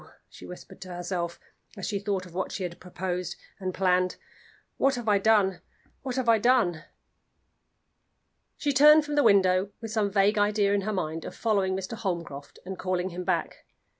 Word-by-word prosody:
she - - -12
whispered 180 - -11
to 185 - -8
herself, 175 -1 -4 0.4
as 195 - -5
she 205 -1 -2
thought 195 -2 -2
of 175 - -14
what 190 +1 -3
she 190 - -4
had 175 -1 -5
proposed 180 0 -4 0.2
and 185 -1 -3
planned, 185 -1 +1 0.6
"what 275 0 +2
have 240 -2 -6
I 205 -1 +4
done? 200 -3 +3 0.4
what 260 -3 -4
have 260 -2 -1
I 225 -1 +5
done?" 210 -9 +2 1.7
She 290 -1 0
turned 300 +3 +7
from 295 - -4
the 290 - +4
window 195 -4 +4
with 225 -2 -7
some 215 -2 +1
vague 200 +1 +2
idea 205 -1 +2
in 200 - +1
her 215 +3 -2
mind 160 -4 -3
of - - -8
following 200 -4 +1
Mr. 190 +3 -5
Holmcroft 170 -9 -5
and 190 0 -6
calling 185 0 -1
him 180 0 -6
back. - - -2
195 Hz, 180 wpm, -27 LUFS, 180-220 Hz, 1.7 s, turned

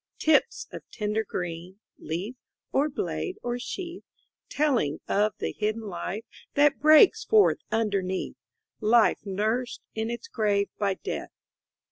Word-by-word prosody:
Tips 315 -1 +2
of - - -7
tender 210 0 -1
green, 175 -1 -5 0.2
Leaf, 180 +9 -4 0.4
or 285 +3 +2
blade, 375 +6 -3
or 245 0 -2
sheath; 350 +6 -6 0.5
Telling 260 - +1
of 210 +1 +2
the - - -2
hidden 215 +1 -2
life 205 +1 -5 0.3
That 290 0 +4
breaks 310 +9 +7
forth 430 -2 +4
underneath, 200 -4 -1 0.5
Life 225 +1 +4
nursed 215 +5 -1
in 220 +1 -2
its 235 - -5
grave 205 - +1
by 200 -2 +1
Death. - - -5
220 Hz, 125 wpm, -27 LUFS, 200-280 Hz, 0.5 s, breaks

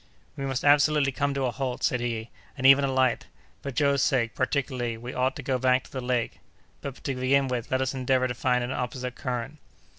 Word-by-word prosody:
"We 135 - -4
must 135 +1 -2
absolutely 145 0 +4
come 140 +2 -1
to 135 -1 0
a 125 - 0
halt," 130 0 -4
said 125 - +2
he, 115 -1 -3 0.3
"and 130 - -3
even 135 +1 +8
alight. 130 -2 +1 0.3
For 140 - -5
Joe's 140 0 +2
sake, 120 -5 +1
particularly, 130 -3 -1
we 120 +2 -7
ought 130 +1 0
to 145 - -7
go 130 -1 0
back 130 0 +3
to - - -17
the 130 - -4
lake; 125 -2 -1 0.4
but, 140 -2 -7
to 135 - -1
begin 135 +2 +2
with, 125 -3 -3
let 130 0 +1
us 130 0 -1
endeavor 130 0 +1
to 120 - -3
find 125 0 +1
an 120 - -3
opposite 125 0 -3
current." 125 +2 -4
130 Hz, 215 wpm, -26 LUFS, 125-140 Hz, 0.4 s, even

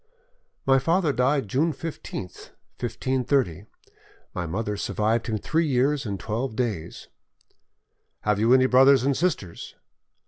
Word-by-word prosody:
"My 135 0 +5
father 165 +2 +1
died 135 -1 +1
June 150 - +1
15th, 140 - -7 0.3
1530; 125 - -1 0.7
my 85 - -3
mother 105 +5 -2
survived 110 +3 -1
him 110 -2 -1
three 160 +9 0
years 135 0 +1
and 100 -2 -4
twelve 115 +2 -3
days." 105 -10 -3 1.1
"Have 105 -1 +1
you 115 +3 +3
any 130 0 +6
brothers 130 0 +5
and 140 0 +1
sisters?" 145 - -3
125 Hz, 125 wpm, -25 LUFS, 105-140 Hz, 1.1 s, any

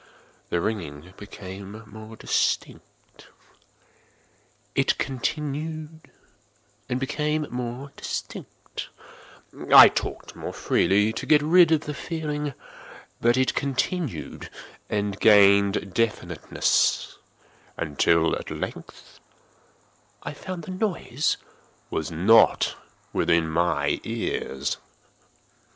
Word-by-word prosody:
The 85 - 0
ringing 85 -4 -4
became 100 +1 -9
more 110 +1 -11
distinct:—it - - -3 1.7
continued 155 +4 -4 0.8
and 125 - -1
became 150 +3 -1
more 125 +3 -5
distinct: - - -7 0.8
I - - +11
talked - - -5
more - - -6
freely 105 +3 +2
to - - -5
get 150 -1 +5
rid 170 +1 +6
of 160 -2 +3
the 150 - -5
feeling: 150 -3 -4 0.7
but 120 +2 +3
it 130 0 +2
continued 140 +3 -2 0.4
and 100 -1 -2
gained 100 -2 +5
definiteness—until, 85 -5 0
at - - -8
length, - - -8 1.0
I - - -5
found 180 +3 -7
that 185 - -7
the 185 - -5
noise 160 - -1 0.5
was 80 - -2
not 100 +8 +4 0.4
within 85 -1 +2
my 80 -3 +1
ears. 115 - -3
115 Hz, 90 wpm, -25 LUFS, 95-150 Hz, 1.7 s, I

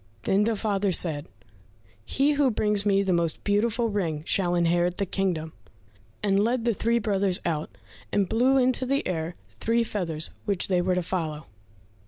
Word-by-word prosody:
Then 200 +2 +2
the 225 0 +1
father 200 -2 0
said, 160 -4 0 0.8
"He 275 - +1
who 285 -2 +3
brings 210 -2 +1
me 200 -1 +3
the 190 -2 +1
most 170 -2 -1
beautiful 225 +3 +1
ring 165 -8 -2
shall 175 -2 +1
inherit 175 +1 +1
the 200 - 0
kingdom," 175 -4 -2 0.7
and 200 0 +3
led 235 +1 0
the 235 - +3
three 230 +3 +1
brothers 200 -4 +1
out, 150 - -3 0.3
and 200 -2 +1
blew 255 +6 +3
into 255 0 +2
the 275 +2 0
air 170 -1 -3 0.2
three 230 +1 +2
feathers, 170 -8 -2
which 200 -2 0
they 180 -2 +2
were 180 +1 +1
to 180 - 0
follow. 160 -4 -3
195 Hz, 170 wpm, -26 LUFS, 175-225 Hz, 0.8 s, who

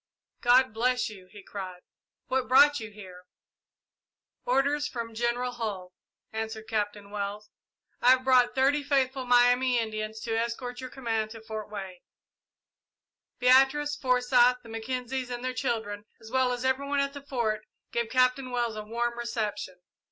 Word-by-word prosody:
"God 250 -1 +5
bless 250 +2 +1
you," 190 -4 -12
he 205 -2 -12
cried; 185 -3 -7 0.4
"what 260 -1 -1
brought 290 +3 +6
you 220 - -7
here?" 185 -4 -12 1.2
"Orders 290 - +2
from 230 -4 -6
General 240 +2 -1
Hull," 205 -7 -5 0.4
answered 220 0 -4
Captain 205 -2 -3
Wells. 205 +1 -5 0.5
"I 245 - +5
have 260 0 0
brought 255 -2 +4
thirty 275 +3 +3
faithful 270 -2 0
Miami 245 +1 +4
Indians 220 -1 -3
to 225 -2 -2
escort 245 +2 -3
your 255 - -6
command 225 -5 -2
to 225 0 -10
Fort 220 -1 -6
Wayne." 190 -3 -7 1.4
Beatrice, 270 +4 +4
Forsyth, 250 -1 +3
the 230 - -13
Mackenzies 250 +3 -3
and 245 0 -5
their 255 - -1
children, 220 -5 -3
as 220 0 -13
well 260 -1 +2
as 245 +1 -3
every 260 +2 +1
one 285 0 0
at 280 0 0
the 285 - -8
Fort, 235 -6 -1 0.3
gave 235 -1 -1
Captain 255 +1 +2
Wells 240 -2 -1
a 215 - -4
warm 235 +2 -2
reception. 210 -6 -4
240 Hz, 150 wpm, -28 LUFS, 220-255 Hz, 1.4 s, brought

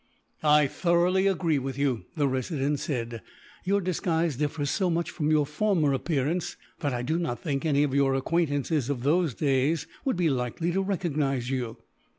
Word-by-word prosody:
"I 150 -1 +5
thoroughly 175 +5 +2
agree 170 -6 +1
with 135 0 -5
you," 135 -5 0
the 145 -2 +2
Resident 135 +2 -1
said. 120 -6 -3 0.4
"Your 200 +2 +2
disguise 170 -4 0
differs 145 +1 -1
so 190 -4 +1
much, 170 0 -1
from 150 -3 -1
your 155 -2 +3
former 155 -1 +1
appearance, 150 +4 -1 0.2
that 145 - -1
I 125 -1 -2
do 160 +7 0
not 140 -9 -2
think 140 -2 -2
any 145 -1 +3
of 140 -3 -1
your 135 -1 +3
acquaintances, 145 -1 0
of 130 -4 -2
those 155 -2 +2
days, 145 +2 +1 0.2
would 265 -9 0
be 170 -4 +2
likely 130 +7 -1
to 190 +3 +1
recognize 150 -9 -1
you." 125 -4 -3
150 Hz, 170 wpm, -27 LUFS, 135-170 Hz, 0.4 s, I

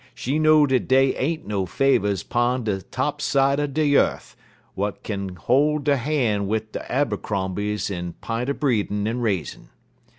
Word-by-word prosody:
She 135 +6 -1
know 155 -1 +5
dat 130 -3 0
dey 135 0 +4
ain't 155 +4 -2
no 100 -3 -2
Favers 100 -3 +1
'pon 120 +1 0
de 100 -3 -2
top - - -3
side 140 +1 +2
er 145 - 0
de 150 +2 0
yeth 145 -1 +1 0.4
w'at 100 +1 -3
kin 100 -3 -4
hol' 145 +9 +2
der 145 -1 +1
han' 120 -7 0
wid 110 +1 -2
de - - -7
Abercrombies 105 -5 -1
in 90 -2 -4
p'int 115 +3 -4
er 140 - 0
breedin' 105 -6 0
en 115 +2 -2
raisin'. 100 -9 -3
120 Hz, 165 wpm, -23 LUFS, 100-140 Hz, 0.4 s, know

